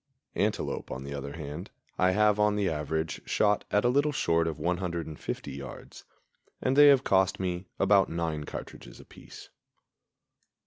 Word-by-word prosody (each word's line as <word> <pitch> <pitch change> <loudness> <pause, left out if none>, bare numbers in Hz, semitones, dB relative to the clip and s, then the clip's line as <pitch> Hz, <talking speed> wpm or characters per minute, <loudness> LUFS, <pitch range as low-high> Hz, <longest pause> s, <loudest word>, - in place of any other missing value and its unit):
Antelope, 105 +1 -2
on 65 +1 -5
the 70 +1 -6
other 70 0 -6
hand, 80 +3 -7 0.3
I 90 - +4
have 105 +2 +3
on 105 0 +3
the 100 -2 0
average 80 0 -2
shot 105 -1 +2
at 105 +3 +2
a - - +5
little 145 +4 +2
short 85 - +1
of 80 - -3
150 85 -1 -3
yards, - - -10 0.5
and 130 - 0
they 145 +1 +8
have 135 -2 +6
cost 95 -4 +2
me 90 0 -3
about 100 -1 +4
nine 80 -3 -3
cartridges - - -9
apiece. - - -13
90 Hz, 150 wpm, -28 LUFS, 80-105 Hz, 0.5 s, they